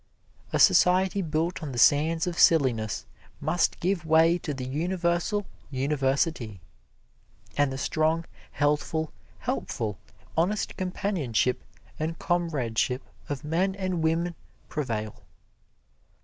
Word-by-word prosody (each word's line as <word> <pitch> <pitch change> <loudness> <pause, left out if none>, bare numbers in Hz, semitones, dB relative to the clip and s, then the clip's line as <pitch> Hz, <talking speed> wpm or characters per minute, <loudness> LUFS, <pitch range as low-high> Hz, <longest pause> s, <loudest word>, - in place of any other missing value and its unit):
A - - +1
society 185 +2 +5
built 165 +1 -1
on 145 -4 -5
the - - -5
sands 155 +6 +4
of 175 -1 -3
silliness 125 - +3 0.3
must 155 +4 +1
give 180 0 0
way 160 +2 +4
to 155 - -4
the 135 -3 -4
universal 175 +7 0 0.2
university, 135 - 0 1.0
and 145 -1 +2
the 135 - -4
strong, 160 +4 +1 0.3
healthful, 150 +2 0 0.3
helpful, 105 -4 -3 0.4
honest 185 +6 0
companionship 180 - -1 0.4
and 160 +1 -2
comradeship 135 - 0 0.3
of 145 -2 -3
men 180 +6 0
and 185 -3 -2
women 165 +2 +1 0.4
prevail. 115 -8 -3
160 Hz, 105 wpm, -27 LUFS, 135-175 Hz, 1.0 s, society